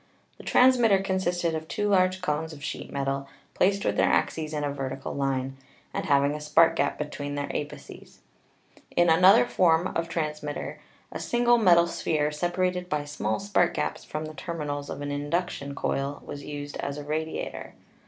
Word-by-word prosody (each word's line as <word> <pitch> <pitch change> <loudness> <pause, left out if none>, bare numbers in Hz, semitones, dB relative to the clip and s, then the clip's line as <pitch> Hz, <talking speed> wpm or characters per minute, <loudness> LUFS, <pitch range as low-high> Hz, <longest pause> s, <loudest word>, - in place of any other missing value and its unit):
The - - -10
transmitter 245 -5 +5
consisted 185 -3 0
of 160 0 -4
two 210 +4 -1
large 185 -1 +3
cones 160 0 -1
of 145 -1 -11
sheet - - -5
metal 140 0 -2 0.3
placed 200 +2 +2
with - - 0
their - - +4
axes 155 -1 0
in 150 -1 -2
a 145 -1 -1
vertical 135 -1 -4
line, 135 -1 -2 0.4
and - - -2
having 140 0 +3
a 150 - -5
spark 155 +2 +4
gap 140 - 0
between 145 -1 -4
their 145 0 -3
apices. 145 0 -7 0.8
In 175 -1 +4
another 190 +8 +7
form 175 -4 +3
of 165 0 -1
transmitter 150 -3 -4 0.3
a - - -5
single 240 0 +3
metal 175 -5 +6
sphere, 150 -3 -1
separated 180 +3 -1
by 150 -1 -1
small 110 -7 -2
spark 185 -3 +1
gaps - - -2
from 155 +1 -5
the 155 - -8
terminals 150 -3 -4
of - - -6
an 145 - -3
induction 145 -1 -2
coil, 140 +1 -2
was 145 -1 -7
used 145 0 -6
as 140 0 -4
a 145 - -6
radiator. 155 +2 -4
155 Hz, 175 wpm, -27 LUFS, 145-180 Hz, 0.8 s, another